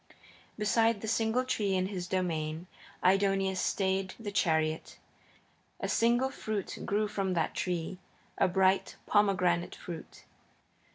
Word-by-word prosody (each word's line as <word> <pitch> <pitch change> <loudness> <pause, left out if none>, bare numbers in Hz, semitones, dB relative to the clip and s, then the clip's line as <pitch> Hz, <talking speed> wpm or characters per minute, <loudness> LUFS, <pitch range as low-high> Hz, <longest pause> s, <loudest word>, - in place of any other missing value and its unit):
Beside 220 0 +2
the 220 - -4
single 225 +3 +1
tree 205 -6 0
in 185 0 +1
his 185 -2 -4
domain 165 -3 -2 0.4
Aidoneus 195 0 +3
stayed 190 -1 0
the 210 -3 -5
chariot. 160 -4 0 0.8
A - - -2
single 240 +3 +2
fruit 215 -6 -4
grew 210 +1 +1
on 190 -2 +1
that 165 -2 0
tree, 180 0 -2 0.4
a - - +5
bright 190 +1 +2
pomegranate 180 -4 +2
fruit. 170 -2 -9
190 Hz, 120 wpm, -31 LUFS, 180-210 Hz, 0.8 s, a